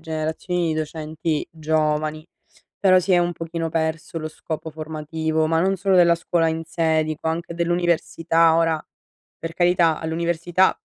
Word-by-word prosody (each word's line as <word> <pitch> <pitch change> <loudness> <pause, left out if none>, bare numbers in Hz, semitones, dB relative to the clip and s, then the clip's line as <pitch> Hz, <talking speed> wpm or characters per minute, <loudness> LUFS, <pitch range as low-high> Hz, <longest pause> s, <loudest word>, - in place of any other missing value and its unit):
generazioni 160 +2 -2
di - - -2
docenti 155 0 -3
giovani, 155 0 -1 0.5
però 185 -2 +5
si 185 +1 0
è 180 - +6
un 175 0 +1
pochino 165 0 -4
perso 160 0 -2
lo 155 - -5
scopo 160 0 -6
formativo, 160 0 -2
ma 160 +1 +2
non 190 +2 +2
solo 195 +1 +1
della 170 -2 +6
scuola 165 0 +1
in 160 0 -3
sé, 160 -1 +1
dico 155 +1 -3
anche 170 +1 -3
dell'università. 170 -1 +2
Ora 165 -2 +1 0.5
per 165 0 -6
carità 175 -2 +3
all'università 170 +3 +1
165 Hz, 150 wpm, -22 LUFS, 155-170 Hz, 0.5 s, è